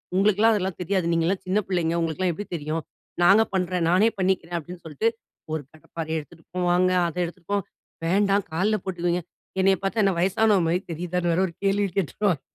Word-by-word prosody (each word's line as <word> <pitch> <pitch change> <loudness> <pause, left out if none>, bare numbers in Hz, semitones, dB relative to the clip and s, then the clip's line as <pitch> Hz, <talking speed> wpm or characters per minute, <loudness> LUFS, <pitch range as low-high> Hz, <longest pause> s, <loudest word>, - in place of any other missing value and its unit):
"உங்களுக்கெல்லாம் 210 +3 +4
அதெல்லாம் 190 -2 -2
தெரியாது. 180 -1 0
நீங்கள்லாம் 170 +3 0
சின்ன 195 +3 +2
பிள்ளைங்க. 170 -2 +1
உங்களுக்கெல்லாம் 165 +2 0
எப்படி 205 +5 -6
தெரியும். 155 +1 -3 0.4
நாங்க 195 +5 +7
பண்ணுறேன் 180 -2 0
நானே 200 +6 +5
பண்ணிக்கிறேன்" 180 -2 0
அப்படின்னு 175 +2 -10
சொல்லிட்டு, 160 +9 0 0.4
ஒரு 160 - -1
கடைப்பாரயை 160 0 -5
எடுத்துட்டு 160 +2 -14
போவாங்க, 180 +1 +3 0.2
அத 170 - -6
எடுத்துட்டு 175 +1 -11
போவங்க. 200 -3 0 0.4
"வேண்டாம் 200 +2 +2
கால்ல 210 +5 +1
போட்டுக்குவீங்க". 175 -1 -1 0.4
என்னைய 195 0 +5
பார்த்தா 215 +3 +1
என்ன 195 - +3
வயசானவ 200 +2 +3
மாரி 175 +2 +2
தெரியுதான்னு 175 +1 -1
வேற 175 - +1
ஒரு 170 - -10
கேள்வி 200 +1 +2
கேட்டுருவாங்க. 190 -2 0
180 Hz, 165 wpm, -25 LUFS, 170-195 Hz, 0.4 s, நாங்க